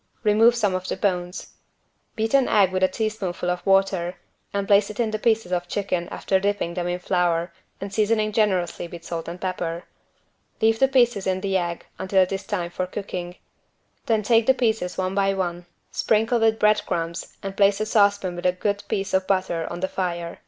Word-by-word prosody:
Remove 225 +2 +5
some 210 -5 +1
of 185 0 -3
the - - -3
bones. 180 -1 -2 0.6
Beat 225 +2 -1
an 275 -2 +4
egg 195 -3 +4
with 185 0 -1
a 185 - +5
teaspoonful 195 -5 -2
of 180 - -4
water 195 -2 +2 0.4
and 200 -1 -1
place 200 0 +4
in 220 +2 -1
it - - -6
the 215 - -2
pieces 220 -4 +1
of 175 -1 -1
chicken 180 -3 -2
after 190 - 0
dipping 200 -3 -1
them 175 0 -2
in 175 0 -1
flour 175 -2 0 0.3
and 195 0 -6
seasoning 215 0 +1
generously 190 -5 0
with 170 0 -10
salt 165 -1 -5
and 170 +2 -6
pepper. 175 -2 -3 0.8
Leave 225 0 +3
the 270 - +5
pieces 240 -7 +2
in 185 0 0
the 195 -1 -1
egg 175 -2 -2
until 190 0 +3
it 185 - -4
is 195 0 -4
time 175 -4 -2
for 185 +1 -3
cooking. 180 -2 -5 0.7
Then 220 -2 +2
take 225 +1 +3
the 265 - +5
pieces 220 -7 0
one 185 0 -1
by 195 0 +1
one, 175 -2 -3 0.2
sprinkle 225 +2 +1
with 225 -1 +3
bread 210 0 +3
crumbs 170 0 -4
and 195 0 -5
place 200 0 +3
a 215 - 0
saucepan 200 -4 +2
with 175 +1 -1
a 180 - +2
good 200 +2 -2
piece 195 0 -2
of 190 0 +1
butter 185 -4 0
on 175 - -6
the 190 - +1
fire. 175 -3 -4
195 Hz, 200 wpm, -24 LUFS, 180-210 Hz, 0.8 s, Remove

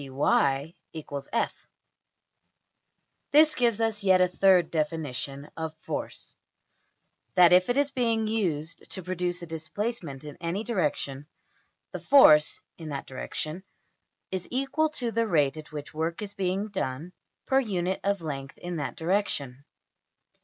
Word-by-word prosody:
\end{DPalign*} 140 +2 +1 2.6
This 305 +1 +6
gives 235 -3 +1
us 225 -2 0
yet 190 -1 +5
a 180 - +5
third 180 -2 +4
definition 145 -3 -3
of 160 -1 -4
\emph{force}; - - -5 1.0
that 180 -1 +7
if 180 +3 +5
it 245 - +1
is 285 0 +2
being 230 -4 +1
used 170 -8 -2
to 190 - -6
produce 180 0 -2
a - - -4
displacement 165 - -4
in 150 -1 -9
any 175 +5 -2
direction, 150 - -2 0.6
the - - -5
force 155 - +6 0.2
(in 160 -2 -7
that 140 -2 -4
direction) 155 +5 -5 0.7
is 185 -2 -4
equal 275 +5 0
to 245 -6 -3
the 230 0 +1
rate 150 -7 +2
at 155 0 -10
which 150 0 -7
work 165 +5 -2
is 205 -1 -7
being 190 +1 -1
done 165 -3 -4 0.3
per 270 - +3
unit 190 -6 -1
of 200 -2 0
length 140 -3 -6
in 175 -1 -5
that 145 - -3
direction. 155 -7 -1
175 Hz, 135 wpm, -27 LUFS, 150-210 Hz, 2.6 s, that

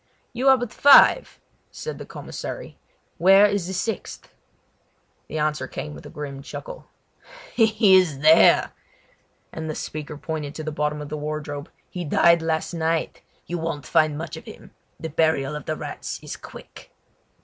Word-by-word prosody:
"You 255 +3 +2
are 265 - +7
but 245 -2 -5
five," 285 - +6 0.3
said 470 - -7
the - - -9
commissary; - - -7 0.4
"where 195 +3 +7
is 200 -4 0
the 190 - -4
sixth?" 195 +2 -5 0.9
The 155 - -5
answer 150 0 -1
came 150 0 -6
with - - -11
a - - -11
grim 140 -2 -7
chuckle. - - -9 0.7
"He 220 -3 +4
is 180 -7 +3
there!" 155 +2 +6 0.8
and 160 0 -6
the 155 - -3
speaker 150 0 -6
pointed 150 -1 -5
to 155 - -6
the 155 - -4
bottom 150 0 -2
of 145 - -9
the 155 - -4
wardrobe. 150 0 -5 0.2
"He 180 - -6
died 170 +2 +4
last 160 +1 -2
night. 165 -1 -2 0.2
You 175 0 -4
won't 160 -3 -4
find 155 -2 +2
much 165 0 -6
of - - -11
him. - - -12 0.3
The 160 - -5
burial 150 -2 +1
of 150 - -7
the 155 - -2
rats - - -6
is - - -6
quick!" - - -13
160 Hz, 165 wpm, -23 LUFS, 150-185 Hz, 0.9 s, are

